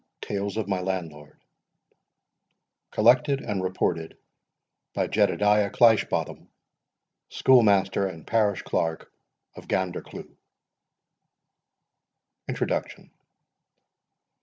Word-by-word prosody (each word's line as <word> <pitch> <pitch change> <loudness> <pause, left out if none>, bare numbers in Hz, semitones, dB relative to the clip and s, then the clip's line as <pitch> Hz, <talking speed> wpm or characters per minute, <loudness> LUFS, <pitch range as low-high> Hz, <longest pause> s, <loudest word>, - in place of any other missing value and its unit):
TALES 100 0 -4
OF 110 -3 -2
MY 95 -2 -1
LANDLORD 80 -6 -5 1.5
COLLECTED 125 +5 +3
AND 100 -2 -3
REPORTED 90 -3 -2 0.8
BY - - 0
JEDEDIAH 105 0 +2
CLEISHBOTHAM, 110 -1 +2 0.8
SCHOOLMASTER 100 -6 +3
AND 80 -4 -10
PARISH 105 -4 0
CLERK 80 -1 -3 0.4
OF - - -12
GANDERCLEUGH. 95 -2 -4 2.1
INTRODUCTION. - - -4
100 Hz, 70 wpm, -25 LUFS, 90-105 Hz, 2.1 s, COLLECTED